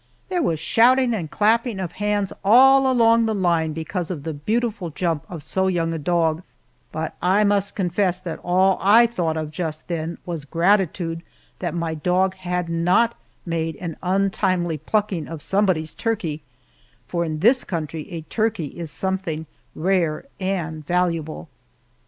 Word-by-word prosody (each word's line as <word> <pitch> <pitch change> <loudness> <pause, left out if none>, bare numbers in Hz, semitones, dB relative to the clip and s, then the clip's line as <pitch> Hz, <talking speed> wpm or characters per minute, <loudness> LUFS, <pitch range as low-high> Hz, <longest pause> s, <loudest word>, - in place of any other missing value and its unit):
There 360 -2 0
was 170 - +1
a - - -8
shouting 250 +1 +4
and 175 -8 -3
clapping 225 - +1
of 180 -3 -3
hands 205 0 -1
all 265 +5 +6
along 230 -2 +4
the 220 - 0
line 170 -4 +1
because 165 +2 -4
of 165 -6 -5
the 160 0 -3
beautiful 210 +4 -2
jump 165 -1 -2
of 165 -5 -7
so 190 0 0
young 165 -3 0
a 165 - -3
dog, 165 0 +1 0.5
but 160 0 -4
I 190 +4 +3
must 200 -1 +1
confess 180 -1 0
that 180 -3 -6
all 185 +2 +3
I 220 +5 +6
thought 175 -9 -1
of 155 -1 -4
just 155 -1 -4
then 165 0 -3
was 170 -4 -4
gratitude 170 0 +1 0.4
that 175 -1 -3
my 170 -1 -2
dog 180 +4 +1
had 180 -2 -3
not 180 +8 +2 0.3
made 165 -1 -2
an 170 -3 -6
untimely 185 -3 0
plucking 190 -1 -1
of 165 -1 -6
somebody's 185 -6 +1
turkey, 185 -10 -2 0.7
for 170 -1 -1
in 155 -2 -3
this 240 - +4
country 160 -3 -5
a 170 -3 -5
turkey 175 - -2
is 165 -2 -5
something 185 -3 -3 0.3
rare 170 - 0
and 170 -5 -2
valuable. 165 - -1
180 Hz, 160 wpm, -22 LUFS, 160-200 Hz, 0.7 s, all